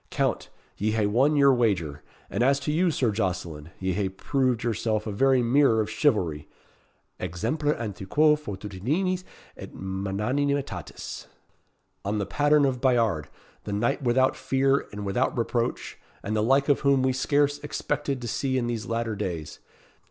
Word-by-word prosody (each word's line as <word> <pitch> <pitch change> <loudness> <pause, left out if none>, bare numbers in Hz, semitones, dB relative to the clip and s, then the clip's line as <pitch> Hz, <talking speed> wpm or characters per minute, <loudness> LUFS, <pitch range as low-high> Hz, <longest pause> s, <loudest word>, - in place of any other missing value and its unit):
"Count, - - -1 0.3
ye 110 +1 0
hae 110 -2 +1
won 130 +9 +3
your 140 -2 +6
wager; 95 - 0 0.3
and - - -3
as 135 +3 +4
to 145 +2 -2
you, 175 +4 +2
Sir 130 -7 +1
Jocelyn, 85 -7 -3
ye 95 0 -1
hae 100 0 -1
proved 125 +4 0
yourself 110 -2 -1
a 110 - -3
very 130 +4 +3
mirror 120 -1 +4
of 110 0 -1
chivalry 105 - 0 0.7
exemplar 115 - -1
antiquoe 115 +8 +2
fortitudinis 145 - -2 0.3
et - - -10
magnanimitatis 105 +10 -3 0.8
on 105 +2 -1
the 100 - -1
pattern 145 +6 +3
of 130 -2 -1
Bayard, 115 - +2 0.4
the 105 - -3
knight 120 +7 0
without 130 +1 +2
fear 135 +1 +1
and 105 0 -6
without 120 +7 0
reproach, 120 0 -2 0.2
and 105 +2 -2
the 105 - +2
like 135 +5 +3
of 145 - +3
whom 140 -2 +3
we 130 0 +2
scarce 145 +2 +1
expected 140 -3 -3
to - - -3
see 130 +3 -1
in 125 - 0
these 115 -3 -3
latter 115 -1 -2
days. 85 -7 -5
120 Hz, 155 wpm, -26 LUFS, 100-140 Hz, 0.8 s, your